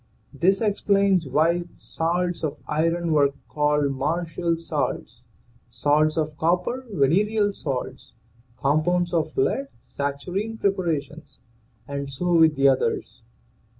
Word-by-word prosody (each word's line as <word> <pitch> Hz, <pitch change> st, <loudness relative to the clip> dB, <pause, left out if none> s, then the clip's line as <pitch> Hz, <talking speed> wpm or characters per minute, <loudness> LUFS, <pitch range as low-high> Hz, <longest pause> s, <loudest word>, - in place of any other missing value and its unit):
This 195 Hz, +4 st, +2 dB
explains 200 Hz, -5 st, +2 dB
why 165 Hz, +5 st, +2 dB
salts 175 Hz, +1 st, -2 dB
of 155 Hz, -, -2 dB
iron 165 Hz, +2 st, 0 dB
were 140 Hz, -2 st, +3 dB
called 150 Hz, -1 st, +1 dB
martial 165 Hz, +4 st, -1 dB
salts; 140 Hz, -7 st, -3 dB, 0.5 s
salts 145 Hz, +6 st, +1 dB
of 155 Hz, -1 st, -1 dB
copper, 180 Hz, +10 st, 0 dB
venereal 205 Hz, +7 st, +2 dB
salts; 135 Hz, -9 st, -5 dB, 0.5 s
compounds 175 Hz, +5 st, +1 dB
of 165 Hz, -, -1 dB
lead, 280 Hz, -8 st, +1 dB
saturnine 180 Hz, +11 st, -4 dB
preparations, 160 Hz, -7 st, -2 dB, 0.5 s
and 140 Hz, -1 st, -4 dB
so 175 Hz, +6 st, -1 dB
with 160 Hz, -2 st, +5 dB
the 140 Hz, 0 st, +4 dB
others. 135 Hz, -1 st, 0 dB
165 Hz, 110 wpm, -24 LUFS, 145-180 Hz, 0.5 s, with